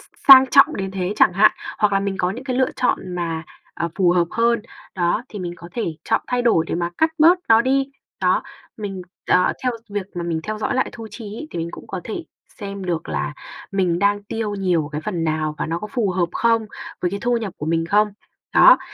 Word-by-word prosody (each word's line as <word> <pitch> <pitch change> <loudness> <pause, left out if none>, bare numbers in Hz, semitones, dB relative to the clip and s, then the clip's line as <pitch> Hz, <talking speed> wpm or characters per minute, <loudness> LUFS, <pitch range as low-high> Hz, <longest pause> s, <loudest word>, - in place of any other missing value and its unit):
s - - -23
sang 265 -1 +11
trọng 275 +4 +5
đến 195 -1 -3
thế 190 0 -2
chẳng - - +5
hạn, 210 +4 +6 0.3
hoặc 210 -1 +2
là 195 - +2
mình 200 0 -2
có 180 0 +1
những 245 +7 -7
cái 255 -2 -2
lựa 260 0 +2
chọn 190 -7 -1
mà, 165 -2 -3 0.3
ờ, 170 - -2
phù 180 -3 +3
hợp 175 -1 +3
hơn, 230 0 +1 0.3
đó, 175 +5 0
thì 210 - -8
mình 175 -2 -4
có 170 0 -11
thể 235 - -2 0.2
chọn - - +1
thay 250 0 0
đổi 225 -9 +3
để - - -1
mà 170 0 -1
cắt 320 0 +3
bớt 335 +4 +6
nó 225 0 +7
đi, 270 +1 +1 0.3
đó. - - +2 0.3
Mình, 195 -3 -5 0.3
ờ, 180 0 +4
theo 250 -1 +1 0.2
việc 200 -2 -3
mà 175 - -3
mình 165 -2 -2
theo 215 +2 -4
dõi - - -1
lại 260 - +1
thu 225 -1 -8
chi 230 - -9
ấy 310 - -7
thì - - -5
mình 165 - -3
cũng - - -10
có 190 - -5
thể 320 +9 -5 0.4
xem 200 -1 -6
được 170 -3 -3
là 145 - -2 0.4
mình 180 -3 +1
đang 205 +1 +2
tiêu 215 -1 -3
nhiều 180 -6 0
cái 150 - -3
phần 170 -2 -3
nào, 155 -1 -1
và - - -2
nó 165 +1 -2
có 210 - -6
phù 215 -4 -1
hợp 180 -2 0
không, 230 -1 +2 0.3
với 180 - 0
cái 200 0 -4
thu 245 0 +2
nhập 215 -5 -4
của 150 - -6
mình 165 0 +1
không? 210 +3 +3 0.5
Đó. - - +8
200 Hz, 240 wpm, -21 LUFS, 175-230 Hz, 0.5 s, sang